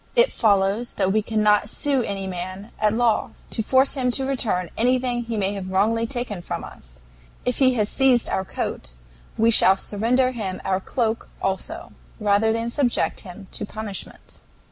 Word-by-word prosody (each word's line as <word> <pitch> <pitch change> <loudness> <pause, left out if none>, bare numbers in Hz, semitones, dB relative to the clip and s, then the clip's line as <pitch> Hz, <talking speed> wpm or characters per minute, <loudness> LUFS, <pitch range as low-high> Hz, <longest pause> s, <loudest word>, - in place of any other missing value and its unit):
It 485 +1 +5
follows 205 +1 +1
that 190 -1 0
we 215 - +3
cannot 210 -1 +2
sue 275 +1 +1
any 200 -4 -3
man 185 +3 -6
at 215 -1 +3
law 235 -2 +1 0.2
to - - -1
force 260 +5 +3
him 255 -3 0
to 270 - -2
return 220 -10 -1
anything 250 +1 +1
he 230 -1 -3
may 200 0 0
have 190 -2 -5
wrongly 220 +5 +1
taken 240 -7 -4
from - - -5
us; - - -12 0.4
if 250 - 0
he 260 -2 +4
has 210 -3 +1
seized 255 0 +3
our 190 - -1
coat, - - -5 0.4
we 225 +1 +4
shall 190 -3 +5
surrender 240 +6 +1
him 200 -7 -4
our 190 -1 +1
cloak 230 +2 -2
also 190 -1 -3 0.3
rather 210 +1 +3
than 230 +1 -2
subject 250 -3 0
him 195 +1 -10
to - - -5
punishment. 210 -1 -7
220 Hz, 170 wpm, -23 LUFS, 195-245 Hz, 0.4 s, It